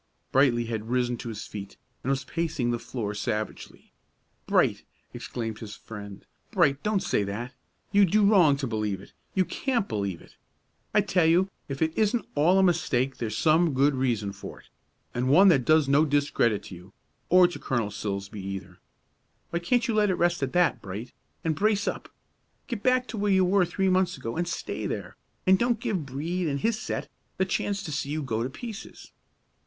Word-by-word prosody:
Brightly 125 -3 +3
had 110 -1 -4
risen 125 0 +1
to 120 - -6
his 110 -1 -6
feet, 100 -1 -8 0.2
and 130 - -3
was 135 0 0
pacing 155 -5 -1
the 120 - -1
floor 110 -4 -4
savagely. 105 +1 -4 0.6
"Bright," - - +3 0.3
exclaimed 115 -2 -5
his 105 -2 -8
friend, 100 -3 -10 0.2
"Bright, 150 -10 +2
don't 210 -2 0
say - - +1
that! 115 +6 -5 0.4
You 200 0 +6
do 205 +3 +3
wrong 180 -9 +5
to 140 - -3
believe 105 -4 -2
it; 100 - -15 0.2
you 190 -1 +3
can't 240 -3 -1
believe 100 -5 -2
it. - - -18 0.6
I 210 - +4
tell 180 -4 +2
you 180 +4 +3 0.2
if 140 +3 -1
it 160 0 -1
isn't 220 +1 +1
all 165 +6 +4
a 190 - +5
mistake 135 -7 +1
there's 110 -2 -3
some 160 0 +3
good 140 +2 +4
reason 120 -6 0
for 100 - -9
it, - - -25 0.4
and 125 +2 0
one 190 +8 +7
that 135 -8 +3
does 155 -2 +4
no 140 +2 +5
discredit 145 -7 +1
to 95 - -9
you, 90 +3 -14 0.4
or 180 0 +7
to 175 - -7
Colonel 115 -5 -1
Silsbee 100 0 -4
either. 95 -2 -7 0.7
Why 170 - 0
can't 240 +8 +1
you 230 - 0
let 210 -1 +3
it 185 - +2
rest 175 -1 +1
at 135 -2 -1
that, 180 -1 +2
Bright, 100 +5 -7 0.3
and 160 - +1
brace 205 +4 +1
up. - - -3 0.6
Get 235 -6 -4
back 255 +2 +3
to 225 - -5
where 205 0 +1
you 190 -1 +4
were 190 0 +3
three 190 +3 -1
months 185 -2 +2
ago, 115 -3 -5
and 175 +1 -1
stay - - -3
there, - - -5 0.3
and 190 0 +5
don't 240 -2 +1
give 205 - -2
Brede 165 +7 -2
and 140 -2 -1
his 225 -1 +1
set - - -4 0.3
the 190 - +2
chance 195 +1 -1
to 155 - -5
see 140 -1 -2
you 155 +1 -2
go 115 -4 -2
to 125 - -1
pieces. 220 - -9
145 Hz, 195 wpm, -27 LUFS, 115-190 Hz, 0.7 s, one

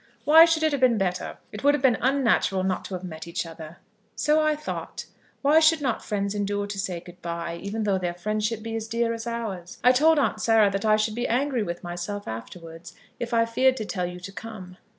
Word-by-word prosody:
"Why 320 +2 +9
should 330 -1 +1
it 315 - +3
have 285 -2 -2
been 245 -3 +4
better? 180 -2 -2
It 210 - -8
would 285 +1 +5
have 280 - -5
been 255 -3 +4
unnatural 245 -7 +2
not 185 -1 -1
to 190 - -5
have 180 - -7
met 160 -2 -7
each 170 - -3
other." 165 0 -10 0.4
"So 305 +1 +2
I 310 0 +2
thought. 305 +1 -6 0.4
Why 295 +3 +6
should 320 0 +4
not 260 -5 -2
friends 200 -1 -2
endure 205 0 -1
to 200 -1 -6
say 185 -4 -3
good 175 0 -14
bye, 170 0 -4
even 215 +2 -3
though 200 -2 +1
their 175 -1 -3
friendship 215 +4 -2
be 225 0 -4
as 225 -1 -4
dear 230 0 0
as 230 +1 -6
ours? 210 -7 -5
I 250 - +7
told 310 +5 +4
Aunt 265 -6 +1
Sarah 220 -2 +4
that 195 +2 -2
I 215 -1 +5
should 215 0 0
be 240 +2 -2
angry 255 0 0
with 175 -4 -4
myself 175 +4 -5
afterwards 165 +9 -9 0.2
if 240 0 -4
I 230 -1 +3
feared 255 +3 +2
to 215 - -4
tell 180 -3 -2
you 180 0 -8
to 195 - -8
come." 190 -2 -9
215 Hz, 230 wpm, -25 LUFS, 180-245 Hz, 0.4 s, Why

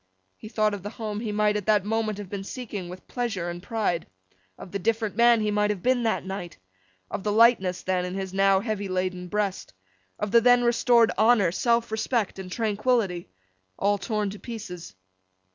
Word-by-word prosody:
He 215 - -11
thought 215 -1 +1
of 200 - -5
the 205 - -5
home 215 -2 -5
he 220 -2 -3
might 210 0 +2
at 210 -1 -3
that 210 -3 +3
moment 220 -1 -1
have 205 -2 -7
been 195 +1 -5
seeking 205 -5 -6
with 180 +1 -11
pleasure 215 -9 -3
and 175 0 -8
pride; 200 -5 -1 0.5
of 180 - -11
the 200 - -3
different 220 +1 -1
man 235 -1 +5
he 210 0 0
might 210 0 +1
have 205 -4 -3
been 255 -1 +2
that 225 -4 0
night; 190 -3 -6 0.5
of - - -3
the 210 - -1
lightness 210 -5 +4
then 185 -1 0
in 180 +1 -4
his 190 -1 -4
now 195 0 +4
heavy 210 -2 -3
laden 185 -1 -2
breast; 200 - -2 0.4
of 210 -1 -3
the 235 - +6
then 245 +1 +5
restored 235 -1 +4
honour, 215 -5 +4
self 235 +4 +1
respect, 220 -2 -1
and 185 -1 -7
tranquillity 215 -4 0 0.5
all 205 +1 +1
torn 210 -1 -2
to 205 - -9
pieces. 180 - -8
210 Hz, 195 wpm, -26 LUFS, 190-225 Hz, 0.5 s, the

